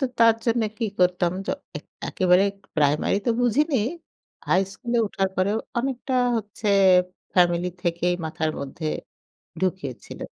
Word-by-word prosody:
তো -, -, +2 dB, 0.2 s
তার 230 Hz, -1 st, +6 dB
জন্য 230 Hz, 0 st, +2 dB, 0.2 s
কি 230 Hz, -, 0 dB
করতাম 180 Hz, -1 st, +3 dB
জ -, -, -12 dB, 0.3 s
এক -, -, -18 dB, 0.2 s
একেবারে 185 Hz, 0 st, +4 dB, 0.3 s
প্রাইমারি 150 Hz, +5 st, +2 dB
তো 235 Hz, -, +4 dB
বুঝিনি। 265 Hz, +4 st, +2 dB, 0.7 s
হাই 185 Hz, +1 st, +4 dB
স্কুলে 240 Hz, +2 st, -2 dB
উঠার 195 Hz, -1 st, 0 dB
পরেও 200 Hz, +4 st, +1 dB, 0.2 s
অনেকটা 260 Hz, 0 st, -3 dB, 0.2 s
হচ্ছে 210 Hz, 0 st, -4 dB, 0.7 s
ফ্যামিলি 175 Hz, 0 st, +3 dB
থেকেই 175 Hz, +1 st, +1 dB
মাথার 160 Hz, 0 st, -1 dB
মধ্যে 145 Hz, +3 st, -4 dB, 0.7 s
ঢুকিয়ে 185 Hz, -8 st, -1 dB
ছিল -, -, -10 dB
190 Hz, 135 wpm, -24 LUFS, 175-230 Hz, 0.7 s, তার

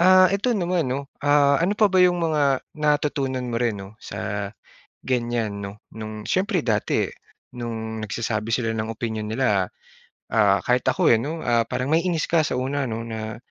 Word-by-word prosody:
Ah, 185 Hz, +1 st, +7 dB
ito 205 Hz, +5 st, 0 dB
naman 175 Hz, -, 0 dB
'no, 140 Hz, +2 st, -2 dB, 0.2 s
ah, 145 Hz, -1 st, +5 dB
ano 190 Hz, +4 st, +2 dB
pa 215 Hz, -, +6 dB
ba 185 Hz, -1 st, +3 dB
yong 180 Hz, -1 st, +4 dB
mga 160 Hz, -3 st, +1 dB, 0.4 s
natutunan 145 Hz, -3 st, +1 dB
mo 115 Hz, -1 st, -2 dB
rin, 115 Hz, -3 st, +1 dB
'no, 95 Hz, +2 st, -10 dB
sa 105 Hz, -1 st, -4 dB, 0.5 s
ganyan, 120 Hz, -5 st, -1 dB
'no? 100 Hz, +1 st, -8 dB, 0.2 s
No'ng, 110 Hz, -1 st, -6 dB
siyempre 185 Hz, -2 st, +1 dB
dati 110 Hz, -3 st, +1 dB, 0.4 s
no'ng 110 Hz, -2 st, -5 dB
nagsasabi 110 Hz, +1 st, -2 dB
sila 115 Hz, -2 st, 0 dB
ng 110 Hz, 0 st, -2 dB
opinyon 110 Hz, -1 st, -3 dB
nila, 110 Hz, -6 st, +2 dB, 0.7 s
ah, 100 Hz, -3 st, +5 dB
kahit 125 Hz, 0 st, +3 dB
ako, -, -, +3 dB
eh, 115 Hz, -, +5 dB
'no, 160 Hz, +4 st, -4 dB
ah, 120 Hz, -1 st, +3 dB
parang 130 Hz, +2 st, -2 dB
maiinis 165 Hz, -1 st, +1 dB
ka 165 Hz, -1 st, +4 dB
sa -, -, -2 dB
una 135 Hz, +2 st, -1 dB
'no. 115 Hz, 0 st, -3 dB
Na 110 Hz, -1 st, -5 dB
125 Hz, 175 wpm, -24 LUFS, 110-155 Hz, 0.7 s, Ah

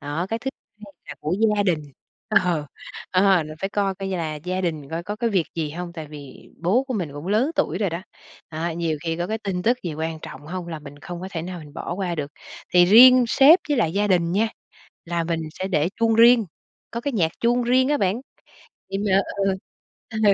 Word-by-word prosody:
đó, 150 Hz, +5 st, -3 dB
cái 225 Hz, -, -1 dB
thứ 265 Hz, -, -3 dB, 0.3 s
hai 200 Hz, -, -14 dB, 0.2 s
là 145 Hz, -, -6 dB
của 155 Hz, +4 st, -1 dB, 0.2 s
gia 205 Hz, -, +3 dB
đình. 175 Hz, -6 st, +1 dB, 0.5 s
Ờ, 175 Hz, -7 st, +2 dB, 0.4 s
ờ, 185 Hz, -2 st, +4 dB
là 155 Hz, 0 st, -8 dB
phải 195 Hz, -, -1 dB
coi 200 Hz, -1 st, 0 dB
coi 195 Hz, 0 st, -5 dB
là 165 Hz, -5 st, -2 dB
gia 180 Hz, +5 st, -3 dB
đình 155 Hz, -6 st, -3 dB
coi 165 Hz, +1 st, -3 dB
có 205 Hz, +3 st, -5 dB
cái 230 Hz, 0 st, 0 dB
việc 185 Hz, -5 st, +1 dB
gì 155 Hz, -3 st, -2 dB
hông, 170 Hz, +2 st, -6 dB
tại 160 Hz, -3 st, -7 dB
vì 145 Hz, -3 st, -12 dB
bố 225 Hz, +10 st, +2 dB
của 260 Hz, -, -3 dB
mình 170 Hz, -8 st, -3 dB
cũng 145 Hz, +4 st, -8 dB
lớn 220 Hz, +9 st, +2 dB
tuổi -, -, 0 dB
rồi 200 Hz, -5 st, 0 dB
đó, 170 Hz, +3 st, -4 dB, 0.5 s
à, 165 Hz, +1 st, -3 dB
nhiều 160 Hz, -2 st, -2 dB
khi 165 Hz, 0 st, -1 dB
có 175 Hz, +1 st, -2 dB
cái 220 Hz, +1 st, -2 dB
tin 190 Hz, -4 st, -3 dB
tức 245 Hz, +4 st, +2 dB
gì 165 Hz, -4 st, -4 dB
quan 160 Hz, +1 st, -3 dB
trọng 145 Hz, -, -10 dB
hông 180 Hz, 0 st, -5 dB
là 160 Hz, -2 st, -5 dB
mình 145 Hz, -1 st, -12 dB
không 175 Hz, +3 st, -7 dB
có 190 Hz, -, -6 dB
thể 165 Hz, -3 st, -4 dB
nào 180 Hz, 0 st, -6 dB
mình 150 Hz, -1 st, -12 dB
bỏ 170 Hz, -, -4 dB
qua 185 Hz, -2 st, -2 dB
được. 145 Hz, -3 st, -4 dB, 0.4 s
Thì 175 Hz, 0 st, +8 dB
riêng 250 Hz, +6 st, +8 dB
sếp 285 Hz, +9 st, +7 dB
với 290 Hz, -, +2 dB
lại 165 Hz, -9 st, +1 dB
gia 205 Hz, +1 st, +1 dB
đình 175 Hz, -3 st, +2 dB
nha, 220 Hz, +3 st, +2 dB, 0.6 s
là 170 Hz, 0 st, -1 dB
mình 165 Hz, -1 st, -2 dB, 0.2 s
sẽ 190 Hz, -, -1 dB
để 160 Hz, -3 st, +1 dB
chuông 225 Hz, -1 st, +2 dB
riêng, 230 Hz, -1 st, +6 dB, 0.5 s
có 235 Hz, -, -4 dB
cái 285 Hz, -1 st, -2 dB
nhạc 165 Hz, -6 st, +1 dB
chuông 240 Hz, +1 st, +2 dB
riêng 255 Hz, +2 st, +3 dB
á 295 Hz, -, +2 dB
bạn, 200 Hz, +5 st, 0 dB, 0.7 s
đề 195 Hz, -, -2 dB
mà 195 Hz, 0 st, +4 dB, 0.2 s
ừ, 195 Hz, -1 st, +2 dB, 0.6 s
ừ, 220 Hz, -, -4 dB
180 Hz, 235 wpm, -23 LUFS, 165-215 Hz, 0.7 s, Thì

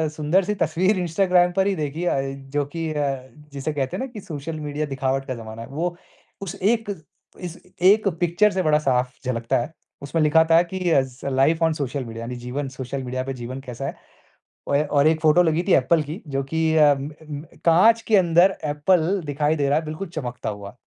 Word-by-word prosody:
सुन्दर-सी 175 Hz, +7 st, +1 dB
तस्वीर 185 Hz, +5 st, +2 dB
इंस्टाग्राम 180 Hz, +1 st, +3 dB
पर 190 Hz, 0 st, +3 dB
ही 200 Hz, -, +1 dB
देखी 155 Hz, 0 st, -3 dB
है 135 Hz, -5 st, 0 dB
अ, 135 Hz, 0 st, -14 dB
जो 145 Hz, +1 st, 0 dB
कि 165 Hz, +3 st, -4 dB
अ, 135 Hz, -3 st, -2 dB, 0.3 s
जिसे 140 Hz, +2 st, -3 dB
कहते 135 Hz, -3 st, -2 dB
हैं -, -, -3 dB
ना -, -, -7 dB
कि 210 Hz, -, -7 dB
सोशल 155 Hz, -1 st, -6 dB
मीडिया 150 Hz, 0 st, -3 dB
दिखावट 135 Hz, -1 st, -2 dB
का 130 Hz, -, -3 dB
ज़माना 110 Hz, -1 st, -8 dB
है 115 Hz, -, -8 dB
वो 170 Hz, +5 st, -2 dB, 0.5 s
उस 195 Hz, -3 st, -5 dB
एक 220 Hz, +2 st, +1 dB, 0.5 s
इस 175 Hz, -2 st, -7 dB, 0.2 s
एक 205 Hz, +3 st, +5 dB
पिक्चर 175 Hz, +4 st, +3 dB
से 185 Hz, -1 st, -1 dB
बड़ा 150 Hz, -2 st, +3 dB
साफ 125 Hz, -3 st, 0 dB
झलकता 115 Hz, -2 st, 0 dB
है। 120 Hz, +7 st, -4 dB, 0.3 s
उसमें 160 Hz, +4 st, -1 dB
लिखा 155 Hz, +2 st, +5 dB
था -, -, +7 dB
है 170 Hz, -, +5 dB
कि 185 Hz, +2 st, -6 dB
S 130 Hz, -4 st, +1 dB
life 140 Hz, +5 st, +2 dB
on 160 Hz, -, +2 dB
social 140 Hz, -2 st, -3 dB
media 115 Hz, 0 st, -7 dB
यानी 125 Hz, +2 st, -5 dB
जीवन 125 Hz, +3 st, -4 dB
सोशल 130 Hz, +1 st, -5 dB
मीडिया 130 Hz, 0 st, -3 dB
पे 135 Hz, +1 st, -4 dB
जीवन 130 Hz, +1 st, -7 dB
कैसा 125 Hz, +1 st, -6 dB
है। -, -, -5 dB, 0.7 s
औए 140 Hz, +1 st, +2 dB
और 145 Hz, 0 st, +3 dB
एक 160 Hz, 0 st, +2 dB
फ़ोटो 160 Hz, +3 st, +5 dB
लगी 165 Hz, 0 st, +1 dB
थी 190 Hz, -, +4 dB
एप्पल 150 Hz, +5 st, +3 dB
की 155 Hz, +7 st, -7 dB
जो 135 Hz, -1 st, -2 dB
कि 160 Hz, +3 st, 0 dB
अम 145 Hz, -2 st, +4 dB
अम, 150 Hz, -1 st, -9 dB, 0.2 s
काँच 205 Hz, +8 st, +5 dB
के 215 Hz, -, +5 dB
अंदर 180 Hz, +1 st, +4 dB
एप्पल 165 Hz, +5 st, +1 dB
दिखाई 145 Hz, +1 st, 0 dB
दे 140 Hz, -3 st, 0 dB
रहा 145 Hz, +2 st, +3 dB
है 160 Hz, -, -8 dB
बिल्कुल 155 Hz, +6 st, -5 dB
चमकता 125 Hz, -9 st, -5 dB
हुआ। 100 Hz, +1 st, -8 dB
150 Hz, 210 wpm, -23 LUFS, 135-170 Hz, 0.7 s, था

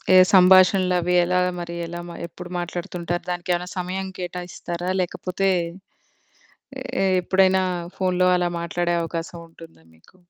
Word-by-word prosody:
ఏ -, -, +9 dB, 0.2 s
సంభాషణలవి 185 Hz, -1 st, +5 dB
ఎలాగ 180 Hz, +1 st, +1 dB
మరి, 170 Hz, 0 st, -6 dB
ఎలా 175 Hz, +1 st, -6 dB
మ -, -, -8 dB, 0.2 s
ఎప్పుడు 175 Hz, +1 st, -10 dB
మాట్లాడుతుంటారు? 175 Hz, 0 st, -4 dB
దానికేమైనా 175 Hz, 0 st, -2 dB
సమయం 190 Hz, +2 st, -3 dB
కేటాయిస్తారా, 175 Hz, 0 st, -5 dB
లేకపోతే, 185 Hz, +2 st, -2 dB, 1.6 s
ఏ -, -, +3 dB, 0.2 s
ఎప్పుడైనా 190 Hz, +1 st, +3 dB, 0.3 s
ఫోన్‌లో 185 Hz, -1 st, +2 dB
అలా 175 Hz, -1 st, 0 dB
మాట్లాడే 175 Hz, +1 st, -1 dB
అవకాశం 165 Hz, +1 st, -5 dB
ఉంటుందా 165 Hz, -, -16 dB
మీకు? 80 Hz, -, -25 dB
180 Hz, 115 wpm, -23 LUFS, 175-185 Hz, 1.6 s, ఏ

